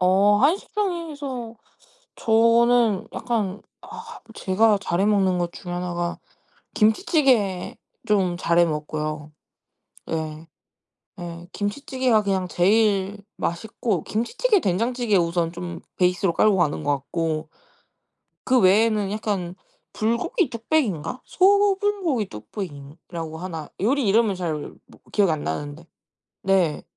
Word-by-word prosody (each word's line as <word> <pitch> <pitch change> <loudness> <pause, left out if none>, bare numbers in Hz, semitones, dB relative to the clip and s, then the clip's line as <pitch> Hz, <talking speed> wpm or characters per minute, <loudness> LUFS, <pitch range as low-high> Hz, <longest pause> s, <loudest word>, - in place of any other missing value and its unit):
어. 195 +3 +4
한식당에서 295 - -1 0.6
저는 230 -1 +3
약간 220 -4 -2 0.2
아. 455 +1 -10
제가 210 +2 +2
잘해 195 +1 0
먹는 195 -3 +2
것 175 -1 -2
중에 175 - -8
하나가 175 -1 -3 0.6
김치찌개 220 - +2 0.3
좀 190 -5 +2
잘 170 -1 +1
해 175 - +7
먹고요. 155 -1 -4 0.8
예. 160 0 -4 0.7
예. 170 0 -8
김치찌개가 245 +1 0
그냥 190 -2 0
제일 200 +2 +2 0.2
맛있고. 195 +1 -2
김치찌개, 420 - +1
된장찌개 230 - +1
우선 170 -1 0
좀 175 0 -6 0.2
베이스로 180 0 +2
깔고 210 +1 +3
가는 155 -3 0
것 145 - +1
같고. 155 +2 -3 1.0
그 255 0 +3
외에는 210 0 +3
약간 195 -5 -2 0.4
불고기 240 - 0
뚝배기인가? 230 - -1
소불고기 390 - +2
뚝배기라고 160 - -8
하나? 165 -3 -6
요리 260 +5 +1
이름을 215 0 +3
잘 175 -4 -2 0.3
뭐 - - -19
기억이 200 -5 +3
안 155 - -2
나는데 145 - -4 0.6
네. 185 -5 +2
200 Hz, 245 characters per minute, -23 LUFS, 170-235 Hz, 1.0 s, 해